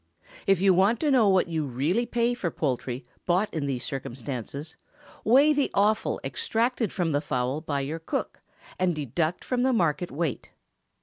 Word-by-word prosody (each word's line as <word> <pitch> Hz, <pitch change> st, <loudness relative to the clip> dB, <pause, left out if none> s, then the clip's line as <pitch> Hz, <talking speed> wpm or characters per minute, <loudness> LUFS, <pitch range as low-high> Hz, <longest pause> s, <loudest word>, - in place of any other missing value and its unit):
If 195 Hz, -2 st, +4 dB
you 195 Hz, -1 st, +5 dB
want 195 Hz, +6 st, +3 dB
to 300 Hz, -2 st, +2 dB
know 235 Hz, -6 st, +5 dB
what 190 Hz, -2 st, +3 dB
you 160 Hz, -2 st, -1 dB
really 150 Hz, -, 0 dB
pay 240 Hz, +1 st, +1 dB
for 195 Hz, -8 st, -2 dB
poultry 125 Hz, -4 st, -3 dB, 0.2 s
bought 185 Hz, +4 st, +1 dB
in 150 Hz, -3 st, -2 dB
these 130 Hz, -3 st, -2 dB
circumstances, 135 Hz, +3 st, -5 dB, 0.5 s
weigh 275 Hz, +7 st, +5 dB
the 285 Hz, -2 st, +1 dB
offal 210 Hz, +2 st, +2 dB
extracted 240 Hz, -, 0 dB
from 175 Hz, -3 st, -1 dB
the 145 Hz, 0 st, +1 dB
fowl 130 Hz, 0 st, -1 dB
by 145 Hz, -3 st, -2 dB
your 150 Hz, +4 st, -4 dB
cook, 160 Hz, -, -4 dB, 0.4 s
and 180 Hz, -2 st, +2 dB
deduct 155 Hz, +4 st, -2 dB
from 250 Hz, -1 st, 0 dB
the 260 Hz, +1 st, +3 dB
market 175 Hz, -3 st, +1 dB
weight. 155 Hz, -4 st, -3 dB
170 Hz, 170 wpm, -27 LUFS, 145-220 Hz, 0.5 s, you